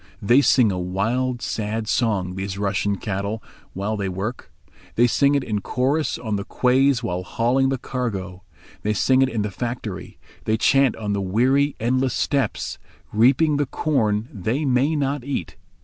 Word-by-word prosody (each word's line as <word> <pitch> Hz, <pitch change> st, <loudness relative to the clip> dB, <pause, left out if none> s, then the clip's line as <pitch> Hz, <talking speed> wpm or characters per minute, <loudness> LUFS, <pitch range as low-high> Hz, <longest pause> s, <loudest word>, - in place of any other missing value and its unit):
They 120 Hz, +7 st, +4 dB
sing 125 Hz, -6 st, +4 dB
a 90 Hz, -, -2 dB
wild, 115 Hz, +8 st, -1 dB
sad 110 Hz, 0 st, -3 dB
song, 100 Hz, -7 st, 0 dB
these 95 Hz, +1 st, -4 dB
Russian 100 Hz, 0 st, 0 dB
cattle, 100 Hz, +2 st, -3 dB
the -, -, -23 dB, 0.2 s
while 100 Hz, +3 st, -2 dB
they 100 Hz, -2 st, -2 dB
work. 100 Hz, +7 st, -5 dB, 0.4 s
They 120 Hz, -, +5 dB
sing 140 Hz, +4 st, +3 dB
it 140 Hz, -, +1 dB
in 105 Hz, -4 st, -2 dB
chorus 135 Hz, +8 st, 0 dB
on 110 Hz, -4 st, -2 dB
the 100 Hz, -, -3 dB
quays 130 Hz, +2 st, +2 dB
while 90 Hz, -4 st, -2 dB
hauling 125 Hz, +7 st, +1 dB
the 135 Hz, -, 0 dB
cargo, 100 Hz, -8 st, -4 dB, 0.4 s
they 105 Hz, -, 0 dB
sing 130 Hz, +4 st, +3 dB
it 135 Hz, -, +3 dB
in 110 Hz, -4 st, -1 dB
the 105 Hz, -, -3 dB
factory, 115 Hz, -2 st, -5 dB, 0.3 s
they 110 Hz, 0 st, +1 dB
chant 135 Hz, +2 st, +3 dB
on 105 Hz, -2 st, -3 dB
the 100 Hz, -, -1 dB
weary, 130 Hz, +9 st, +2 dB
endless 130 Hz, +2 st, +1 dB
steppes, 135 Hz, -7 st, -1 dB, 0.3 s
reaping 135 Hz, +7 st, +4 dB
the 145 Hz, -1 st, 0 dB
corn 110 Hz, -8 st, 0 dB
they 115 Hz, -, -2 dB
may 135 Hz, +4 st, +2 dB
not 140 Hz, -2 st, -1 dB
eat. 130 Hz, -, -4 dB
115 Hz, 170 wpm, -22 LUFS, 100-130 Hz, 0.4 s, They